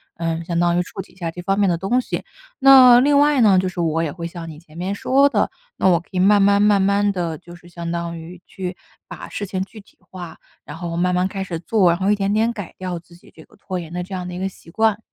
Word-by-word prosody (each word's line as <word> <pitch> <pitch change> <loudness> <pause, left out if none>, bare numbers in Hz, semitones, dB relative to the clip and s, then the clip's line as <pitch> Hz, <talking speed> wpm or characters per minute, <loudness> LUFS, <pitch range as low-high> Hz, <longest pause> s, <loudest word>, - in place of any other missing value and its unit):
呃， 165 0 -3
相 170 0 -2
当 175 0 +2
于 180 - +1
触 195 - -8
及 - - -16
一 - - -25
下 170 -3 -4
这 175 - -8
方 195 +3 0
面 200 - +3
的 175 - +2
东 195 +9 0
西。 - - -5 0.4
那 260 -3 +8
另 285 +2 +3
外 290 -2 +4
呢， 200 -4 +5
就 185 - +1
是 185 -1 -6
我 165 -1 0
也 150 - -2
会 170 +1 -6
像 170 -1 -8
你 155 -1 -10
前 160 -1 -17
面 185 +3 -3
说 270 +7 +3
的， 285 - +1 0.3
那 - - +2
我 170 -2 +4
可 175 - -20
以 185 - -2
慢 205 +2 +5
慢 200 +1 +4
慢 210 -1 +4
慢 200 +1 +2
地 170 -4 -3
就 175 -1 -13
是 175 0 -17
相 170 -1 -6
当 170 0 -4
于 170 +2 -11
去 185 -1 -6 0.3
把 - - -9
事 205 - -4
情 185 0 -3
具 215 +3 -13
体 - - -26
化， 180 -3 -10 0.3
然 - - -9
后 170 0 -5
慢 180 +1 +1
慢 180 +1 +1
开 195 0 -5
始 170 -3 -5
做， 190 0 +2
然 170 +2 +1
后 195 +2 +2
一 - - +4
点 200 0 -1
点 225 +2 +2
改 205 -4 -8
掉 185 -2 -4
自 170 0 -19
己 175 - -20
这 160 - -14
个 - - -23
拖 190 -2 -5
延 165 -2 -9
的 180 +1 -4
这 190 +2 -10
样 180 -1 -5
的 180 - -7
一 - - -6
个 190 - -1
习 170 - -18
惯。 220 0 +1
185 Hz, 310 characters per minute, -20 LUFS, 170-200 Hz, 0.4 s, 那